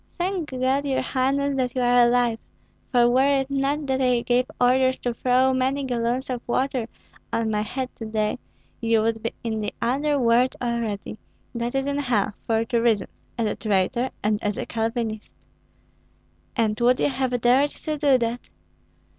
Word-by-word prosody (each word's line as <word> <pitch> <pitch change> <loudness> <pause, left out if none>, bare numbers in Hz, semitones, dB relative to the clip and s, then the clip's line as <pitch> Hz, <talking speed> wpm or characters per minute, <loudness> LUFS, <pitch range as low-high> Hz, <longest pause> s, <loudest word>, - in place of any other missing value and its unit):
Thank 355 -3 -2
God, 260 +2 0
your 275 -2 0
highness, 275 +2 0
that 250 -1 -1
you 255 - 0
are 245 0 +5
alive; 240 -2 +2 0.5
for 240 -2 +5
were 270 +3 +3
it 270 +1 -7
not 275 +2 0
that 265 -1 0
I 250 -2 +2
gave 250 +1 +1
orders 260 +1 +3
to 245 - -1
throw 255 +2 +2
many 265 +2 0
gallons 245 0 -1
of 245 -2 -3
water 255 -1 0 0.4
on 225 -1 0
my 210 -1 0
head 255 +5 -3
to 225 - -6
day, 215 +2 -1 0.4
you 225 -1 +2
would 225 0 -1
be 230 - -2
in 220 -2 -2
the 210 - -2
other 285 +5 +1
world 245 0 +3
already, 230 -4 -3 0.3
that 235 +1 -3
is, 270 0 0
in 280 0 -1
hell, 240 -8 0
for 225 0 +1
two 235 -1 0
reasons, 225 -4 0 0.2
as 230 - 0
a 210 - -1
traitor 215 +4 0
and 210 0 0
as 205 -1 -1
a - - -3
Calvinist." 225 -1 -3 1.2
"And 215 -3 0
would 245 +1 +3
you - - +2
have 260 -2 -1
dared 255 +5 +4
to 310 +1 -4
do 285 -3 +4
that?" 235 0 -3
245 Hz, 180 wpm, -24 LUFS, 230-265 Hz, 1.2 s, are